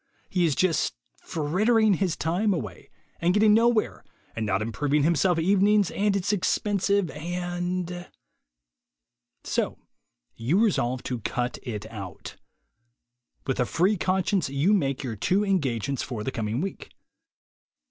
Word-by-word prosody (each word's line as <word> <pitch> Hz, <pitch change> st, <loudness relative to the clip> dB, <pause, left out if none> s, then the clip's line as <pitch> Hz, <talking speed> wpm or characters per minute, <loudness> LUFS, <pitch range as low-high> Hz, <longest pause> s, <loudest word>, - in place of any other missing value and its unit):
He 180 Hz, -2 st, +1 dB
is 155 Hz, -4 st, +1 dB
just 165 Hz, -, +1 dB, 0.3 s
frittering 210 Hz, +8 st, +2 dB
his 185 Hz, -2 st, 0 dB
time 185 Hz, +5 st, +1 dB
away, 105 Hz, -, -7 dB, 0.3 s
and 175 Hz, +3 st, +2 dB
getting 210 Hz, 0 st, +5 dB
nowhere, 230 Hz, 0 st, +2 dB, 0.3 s
and 110 Hz, -1 st, -2 dB
not 95 Hz, +1 st, +1 dB
improving 140 Hz, +6 st, 0 dB
himself 170 Hz, +2 st, +2 dB
evenings, 200 Hz, +3 st, +3 dB
and 205 Hz, 0 st, +1 dB
it's 200 Hz, +1 st, 0 dB
expensive, 200 Hz, -1 st, +1 dB
and 175 Hz, +2 st, -4 dB, 0.6 s
— -, -, -59 dB
So -, -, -1 dB, 0.6 s
you 135 Hz, -, +1 dB
resolve 130 Hz, -, +1 dB
to 125 Hz, -2 st, -3 dB
cut 125 Hz, +3 st, -3 dB
it 110 Hz, -4 st, -5 dB
out. 100 Hz, -5 st, -8 dB, 1.1 s
With 135 Hz, -, -2 dB
a 125 Hz, -, +3 dB
free 190 Hz, +5 st, +2 dB
con 185 Hz, 0 st, 0 dB
science 195 Hz, -8 st, 0 dB
you 140 Hz, +9 st, +2 dB
make 140 Hz, -9 st, 0 dB
your 120 Hz, -4 st, -4 dB
two 190 Hz, -, +1 dB
engagements 140 Hz, -, 0 dB
for 115 Hz, -5 st, -5 dB
the 135 Hz, -, -2 dB
coming 115 Hz, +1 st, -2 dB
week. 195 Hz, +1 st, -5 dB
170 Hz, 135 wpm, -26 LUFS, 125-195 Hz, 1.1 s, getting